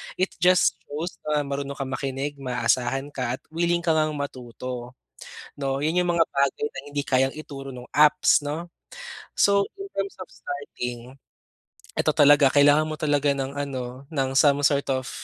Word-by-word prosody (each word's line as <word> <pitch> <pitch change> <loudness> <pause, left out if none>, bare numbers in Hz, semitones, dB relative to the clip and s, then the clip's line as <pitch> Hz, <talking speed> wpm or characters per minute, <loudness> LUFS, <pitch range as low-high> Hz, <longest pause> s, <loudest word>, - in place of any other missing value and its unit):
It 185 +1 0
just 180 +1 +4
shows 155 +5 -5
na 150 -1 +1
marunong 140 0 -4
kang 135 -1 -5
makinig, 135 +2 -3
maaasahan 130 +1 0
ka, 125 -2 -2
at - - -36
willing 170 +1 0
ka 170 - +2
ngang 155 -1 +1
matuto, 125 -2 -6 0.7
'no? 135 +1 -1
Yun 165 +4 +2
yung 180 -1 +1
mga 165 - +5
bagay 140 +1 +1
na - - -6
hindi 145 0 -2
kayang 135 +1 +1
ituro 140 -3 -8
nung 125 0 -10
apps, 150 0 +5
'no? 155 +4 -5 0.6
So, 200 0 +3 0.2
in 395 - -6
terms 195 0 -1
of 185 - -7
starting, 125 -3 -7 0.8
eto - - +2
talaga, 145 -1 +6
kailangan 145 +2 +5
mo 155 - -3
talaga 145 -1 +2
ng 135 0 -4
ano, 130 -2 -5
ng 135 -3 0
some 145 0 +5
sort 140 0 +2
of 130 -1 -3
140 Hz, 165 wpm, -25 LUFS, 135-155 Hz, 0.8 s, talaga